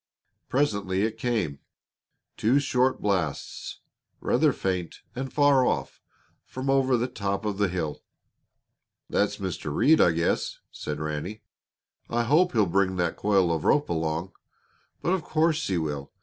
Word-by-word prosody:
Presently 100 -8 +1
it 110 0 -2
came, 105 - -1 0.8
two 120 +6 +3
short 130 -2 +1
blasts, 90 -8 -2 0.4
rather - - +3
faint 90 -3 -3
and 130 +1 -4
far 145 -3 +4
off, - - -1 0.4
from 130 +1 -3
over 135 -2 +3
the 120 +2 0
top 100 -3 -3
of 105 -1 -2
the 100 - +3
hill. 85 -4 -3 1.1
"That's 105 0 +1
Mr. 95 -6 -4
Reed, 155 - +4
I 85 - +5
guess," 85 +1 0
said 75 -1 -5
Ranny. 75 +7 -4 0.7
"I 120 0 +1
hope 160 +9 +3
he'll 110 -4 +4
bring 95 +1 +1
that 85 -2 0
coil 95 -5 +2
of 80 - -2
rope 150 - +3
along. 80 +2 -2 0.7
But 175 - +1
of 190 - 0
course 160 +1 +1
he 95 - 0
will. 75 -4 -3
100 Hz, 145 wpm, -26 LUFS, 85-130 Hz, 1.1 s, I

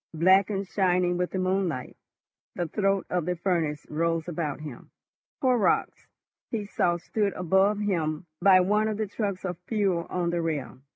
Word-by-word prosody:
Black 185 +4 +5
and 195 -2 -2
shining 180 -2 +1
with 180 0 0
the - - -4
moonlight, 185 -7 -1 0.6
the 175 - -2
throat 195 +2 0
of 180 -2 -1
the 180 - 0
furnace 165 -4 -1
rose 165 +1 -1
about 155 -4 -3
him. 145 -6 -9 0.5
Horrocks, 250 -5 +1 0.4
he 215 -3 -3
saw, 175 -3 +1
stood 200 +3 -1
above 190 +4 +2
him 170 -6 -1 0.2
by 185 -1 +7
one 210 +4 +2
of 215 -1 -2
the 215 - -1
trucks 200 -2 -3
of 180 -2 -4
fuel 195 -6 0
on 175 -1 -1
the 170 0 0
rail. 145 -7 -3
180 Hz, 165 wpm, -27 LUFS, 170-200 Hz, 0.6 s, by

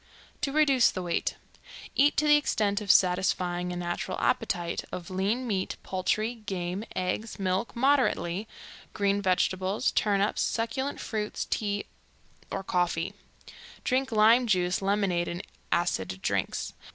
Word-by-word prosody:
To 285 -2 0
reduce 275 -5 +4
the 185 - -4
weight: 170 -1 -1 0.6
Eat 290 +2 +4
to 305 - +3
the 295 - +7
extent 210 -8 +1
of 205 - -7
satisfying 180 -1 +2
a - - -4
natural 175 0 -3
appetite, 170 -1 0
of 175 0 -6
lean 200 +7 0
meat, 195 -5 -2
poultry, 200 +5 0
game, 195 -4 -4
eggs, 185 +5 -2
milk 190 +3 -1
moderately, 235 -7 +2 0.5
green 200 -1 +1
vegetables, 185 +1 +1
turnips, 205 -1 +1
succulent 250 +5 -1
fruits, 210 -2 -3
tea 205 -1 -2 0.6
or 195 - -3
coffee. 180 0 0 0.7
Drink 260 0 0
lime 225 +3 +5
juice, 180 -3 +1
lemonade, 195 -3 +1
and 175 +2 -4 0.3
acid 95 - 0
drinks. - - -1
200 Hz, 125 wpm, -28 LUFS, 180-225 Hz, 0.7 s, the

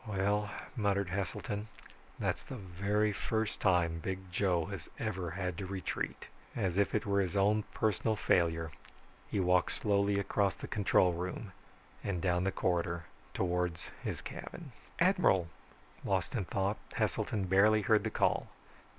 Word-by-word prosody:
"Well," 105 +1 +1 0.3
muttered 100 -4 +1
Heselton, 100 +3 -3 0.5
"that's - - -1
the - - -8
very 100 +1 0
first 110 +2 -1
time 85 -4 +3
Big 95 +1 -5
Joe 90 -3 +2
has 100 -5 -7
ever 95 -6 -2
had 90 0 -3
to 95 - -4
retreat." 95 -1 -3 0.3
As 95 -6 0
if 100 +1 +2
it 105 - +1
were 100 -1 +2
his 95 0 -2
own 105 +2 +3
personal 110 +1 +1
failure, 85 -4 +2 0.6
he 100 - 0
walked 90 -1 +3
slowly 100 -1 +2
across 100 0 +1
the - - -7
control 95 -3 +3
room 90 +4 -4 0.5
and 100 -3 -1
down 90 0 +1
the 95 - +2
corridor 85 -2 0 0.3
towards 90 -2 -1
his - - -3
cabin. - - -8 0.3
"Admiral!" 90 -3 +4 0.5
Lost 95 -3 0
in 110 -7 -1
thought, 100 +3 0 0.2
Heselton 100 -3 0
barely 105 +3 +5
heard 110 +2 +4
the - - 0
call. - - +1
95 Hz, 145 wpm, -33 LUFS, 90-105 Hz, 0.6 s, barely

